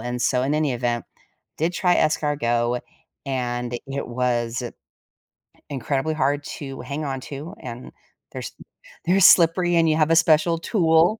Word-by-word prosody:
and 120 0 -4
so 125 -1 +2
in 140 +3 0
any 150 -3 +1
event, 120 -1 -1 0.5
did 165 +3 0
try 180 0 +2
escargot, 125 -6 +1 0.5
and 120 -2 -2
it 135 -1 -4
was 120 0 -1 1.1
incredibly 140 +3 -2
hard 145 0 0 0.2
to 135 -3 -7
hang 145 +4 -5
on 135 -1 -3
to, 150 +8 -8
and 120 0 -8 0.4
they're - - -5
s - - -6 0.5
they're 190 +3 +3
slippery 175 +1 +6
and 165 -1 +4
you 155 - +3
have 155 0 +2
a - - +5
special 165 +1 +4
tool. 170 +1 +3
140 Hz, 150 wpm, -23 LUFS, 125-160 Hz, 1.1 s, slippery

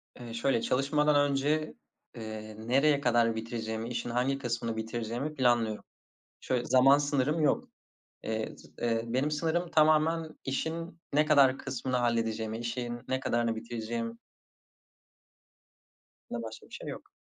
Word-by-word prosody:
Eee, 120 -2 -8
şöyle, 115 0 +1
çalışmadan 145 +2 +2
önce, 150 +3 0 0.4
eee, 110 -1 -7
nereye 140 +5 +3
kadar 120 -3 +3
bitireceğimi, 110 0 -4
işin 120 0 -3
hangi 125 +3 +1
kısmını 120 -3 -2
bitireceğimi 120 +6 -3
planlıyorum. 120 -5 +2 0.6
Şöyle 125 -1 -1
zaman 135 +2 +6
sınırım 145 +2 +1
yok. 150 - +2 0.6
Eee, 110 0 -3
z - - -16
eee, 115 -1 0
benim 130 +6 0
sınırım 165 +3 0
tamamen 155 +1 +3
işin 165 +5 -3
ne 150 +1 +4
kadar 140 -3 +5
kısmını 130 -1 -2
halledeceğimi, 115 -2 0
işin 120 0 -3
ne 130 0 0
kadarını 120 -3 0
bitireceğim. 115 0 -4 2.1
Bundan 120 -1 -4
başka 110 0 -8
bir - - -28
şey - - -7
yok. - - -8
125 Hz, 130 wpm, -30 LUFS, 115-145 Hz, 2.1 s, zaman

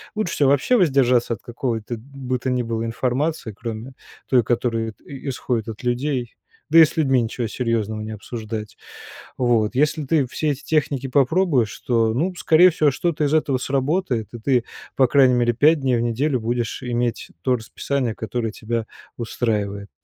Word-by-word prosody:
Лучше 215 -5 -1
всего 140 -2 +3
вообще 145 - +3
воздержаться 130 - +3
от 110 - -8
какого-то 120 -2 -3
бы 130 0 -5
то 130 +2 -2
ни 125 -1 0
было 115 -1 -2
информации, 125 +2 -1
кроме 115 +4 -6 0.3
той, 125 -2 +4
которая 115 -1 -1
т - - -31 0.3
исходит 120 -3 -2
от 110 0 -7
людей, 125 0 -1 0.4
да 165 - +8
и 160 - +10
с 155 - -8
людьми 135 -5 +3
ничего 115 +1 -3
серьезного 110 -2 -2
не 110 +1 -6
обсуждать. 110 0 -6 0.6
Вот. 120 -3 +1
Если 150 +2 +1
ты 145 0 +2
все 150 +5 -2
эти 140 0 -6
техники 145 -4 0
попробуешь, 135 - +2
то, 115 -2 +2
ну, 175 +9 0
скорее 175 +2 +5
всего, 155 -2 +3
что-то 155 +2 -1
из 145 - 0
этого 145 -4 +2
сработает, 135 - -1
и 120 - -7
ты, 125 +1 +2 0.3
по 135 - +5
крайней 130 -1 +5
мере, 120 -1 +2
5 150 +5 +4
дней 130 -2 +2
в - - 0
неделю 125 +4 0
будешь 120 +1 -2
иметь 120 -1 -2
то 130 - +3
расписание, 120 +1 -3
которое 115 0 -3
тебя 115 +1 -3 0.3
устраивает. 105 -4 -2
125 Hz, 170 wpm, -22 LUFS, 115-140 Hz, 0.6 s, и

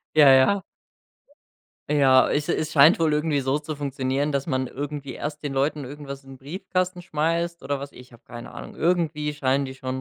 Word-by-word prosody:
Ja, 145 -3 +8
ja. 135 +10 +4 1.3
Ja, 135 -3 +5
es 150 +1 -1
es 155 0 -1
scheint 155 +4 +6
wohl 160 -2 +2
irgendwie 150 -1 +1
so 135 +2 0
zu 155 +1 -6
funktionieren, 140 +1 -1
dass 140 -1 -1
man 130 -4 -1
irgendwie 145 -1 -6
erst 150 0 -5
den 145 -2 -4
Leuten 145 +1 0
irgendwas 140 0 -8
in 135 - -12
den 135 - -11
Briefkasten 180 +5 -3
schmeißt 170 +1 -1
oder 145 -1 -2
was, 140 +1 -8
ich 125 +1 -14
hab 120 - -18
keine 120 0 -10
Ahnung. - - -9
Irgendwie 160 -3 0
scheinen 140 -1 +1
die 130 - -6
schon 130 0 -5
145 Hz, 190 wpm, -24 LUFS, 135-155 Hz, 1.3 s, Ja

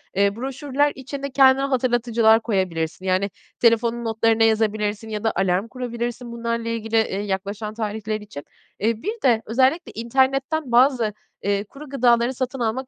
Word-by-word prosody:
Eee, 200 +1 +2
broşürler 275 +3 -1
içinde 275 +1 -6
kendine 265 0 +5
hatırlatıcılar 235 -4 +3
koyabilirsin 185 -5 -2
yani 190 +2 +1 0.3
telefonun 235 0 +2
notlarına 225 0 +2
yazabilirsin 215 -1 0
ya 210 -1 -4
da 225 - +2
alarm 190 +2 +1
kurabilirsin 240 -1 -5
bunlarla 230 0 -3
ilgili, 225 -1 -3
eee, 205 -3 0
yaklaşan 205 +2 -4
tarihler 215 -1 -3
için. 200 -9 -9 0.4
Eee, 220 +2 -1
bir 430 +4 -4
de 235 -4 +4
özellikle 260 +9 +1
internetten 265 +5 0
bazı, 240 -3 +4 0.3
eee, 200 0 0
kuru 275 +7 -12
gıdaları 240 -2 +2
satın 255 +1 -4
almak 245 +3 -2
230 Hz, 145 wpm, -22 LUFS, 215-260 Hz, 0.4 s, kendine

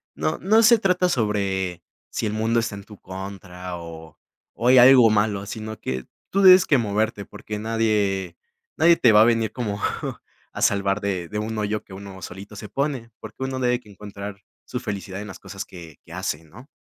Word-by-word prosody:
No 75 +2 -1
no 220 +4 +4
se 230 +1 +7
trata 180 -3 +2
sobre 100 - -1 0.3
si - - -3
el 105 - -1
mundo 110 +2 +1
está 115 -2 -2
en 100 - -9
tu 105 0 -14
contra 95 -1 -8
o 80 -2 -10 0.4
o 120 - -2
hay 130 +1 +7
algo 125 -2 +8
malo, 105 -2 +1
sino 110 +1 -7
que 65 -1 -4 0.2
tú 195 - +2
debes 185 -1 +8
que 145 - +4
moverte, 105 -1 -1
porque 105 +2 -7
nadie 105 -4 0 0.4
nadie 170 +1 +5
te 115 - +5
va 105 - +7
a - - +9
venir 115 -2 +2
como 105 -5 -3 0.7
a - - -7
salvar 100 0 +2
de 95 -4 -2
de 105 - -4
un 110 +1 -3
hoyo 105 0 -2
que 95 - -14
uno 95 0 -9
solito 100 +3 -9
se 105 - -8
pone, 135 -3 -3
porque 110 +4 -8
uno 130 0 -3
debe 125 -1 +1
que 110 - -20
encontrar 100 0 -8 0.2
su 125 - -4
felicidad 100 -4 -5
en 105 - -7
las 95 - -10
cosas - - -7
que 85 -4 -12
que - - -17
hace, 75 +2 -3
¿no? 110 - -14
105 Hz, 200 wpm, -23 LUFS, 95-115 Hz, 0.7 s, a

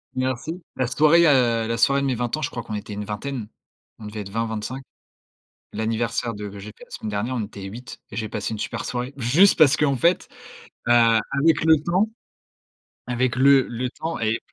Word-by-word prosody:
Merci! 130 +7 -3
La 130 -2 0
soirée, 155 +6 +5
heu, 120 -5 +3
la 115 0 -1
soirée 140 +4 +3
de 140 - -1
mes 130 - 0
20 120 +2 -2
ans 155 - -6
je 140 - -1
crois 120 - -6
qu'on 110 - -7
était 105 0 -5
une 105 0 -5
vingtaine. 110 +2 -5 0.5
On 110 - -9
devait 105 0 -6
être 100 - -9
20-25. 115 +3 -3 0.9
L'anniversaire 115 +2 -2
de 105 0 -6
que 100 - -10
j'ai 100 +2 -8
fait - - -15
la - - -17
semaine 110 - -5
dernière, 115 +5 -2
on 115 - -1
était 100 -1 -11
8 115 +6 -9
et - - -8
j'ai 110 - -2
passé 105 +1 -3
une 105 - -6
super - - -4
soirée. 125 +2 -4
Juste 145 +12 +4
parce 150 -1 +6
qu'en 140 -2 +2
fait, 170 +9 +2 0.6
heu, 120 - +5
avec 120 +7 +3
le 160 0 +6
temps, 185 +5 +2 1.0
avec 125 0 0
le 135 +1 +6
le 125 +2 -3
temps 165 +3 -5
et 110 +1 0
120 Hz, 205 wpm, -23 LUFS, 110-140 Hz, 1.0 s, parce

